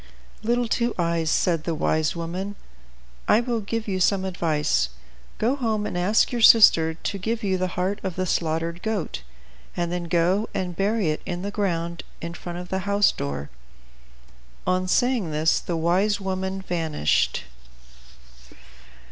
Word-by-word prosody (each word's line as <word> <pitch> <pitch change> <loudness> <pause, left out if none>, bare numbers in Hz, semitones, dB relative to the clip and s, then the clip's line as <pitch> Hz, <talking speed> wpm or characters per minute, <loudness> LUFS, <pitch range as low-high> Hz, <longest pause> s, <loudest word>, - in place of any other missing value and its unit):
"Little 240 +2 +1
Two 235 +1 0
Eyes," 170 -2 0
said 165 -2 +1
the 165 -1 -2
wise 155 +1 +1
woman, 180 +4 -4 0.7
"I - - +5
will 240 -1 -1
give 220 +2 -3
you 190 -2 -1
some 190 +1 +2
good 190 - -2
advice. 150 - +1 0.5
Go 245 +5 +1
home, 220 -6 -1
and - - -4
ask 185 +5 +2
your 240 -2 -2
sister 165 -8 +7
to 200 - -4
give 225 +4 -2
you 190 -2 +1
the 185 -1 -2
heart 190 +3 0
of 190 -3 -4
the 185 - -1
slaughtered 165 0 -1
goat, 215 - -3 0.6
and 175 -1 -1
then 175 -1 -2
go 180 +5 +1
and 180 -2 -2
bury 200 -3 +1
it 155 - -4
in 175 -1 -3
the 200 - -3
ground 170 -5 -2 0.2
in 170 0 -5
front 175 0 -7
of 180 0 -7
the 190 - -1
house 200 0 +4
door." 70 0 -5 1.1
On 185 0 +1
saying 245 -2 +2
this 155 +2 +2
the 170 - -3
wise 190 +5 +2
woman 190 0 -3
vanished. 160 - 0
185 Hz, 160 wpm, -24 LUFS, 170-205 Hz, 1.1 s, sister